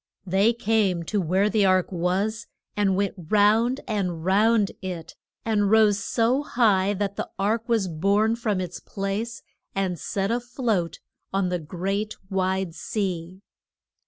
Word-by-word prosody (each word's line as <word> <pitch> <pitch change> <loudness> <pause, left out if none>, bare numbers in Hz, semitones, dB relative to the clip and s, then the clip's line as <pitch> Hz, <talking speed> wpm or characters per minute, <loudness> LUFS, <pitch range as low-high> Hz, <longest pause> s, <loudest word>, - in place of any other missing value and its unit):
They 195 +5 +3
came 215 -6 +1
to 200 +4 -1
where 185 +4 +2
the 210 -1 +2
ark 185 -1 +3
was, 195 +6 -1 0.3
and 200 -2 +2
went 200 0 0 0.2
round 220 +5 +3
and 180 -7 -2
round 210 +2 +3
it, 180 -4 -6 0.3
and 210 -3 +2
rose 215 -2 +5
so 240 +4 +1
high 205 -8 +2
that 200 0 -2
the - - -3
ark 220 +4 0
was 225 -5 +2
borne 200 +7 +2
from 215 -5 -1
its 180 -1 -5
place 200 +4 -4 0.3
and 185 -3 -1
set 195 +1 -2
a 240 - +1
float 235 -8 -2 0.3
on 195 -1 0
the 180 -1 -1
great 195 +6 -3 0.2
wide 190 -2 0
sea. 185 -1 -4
200 Hz, 145 wpm, -25 LUFS, 185-220 Hz, 0.3 s, rose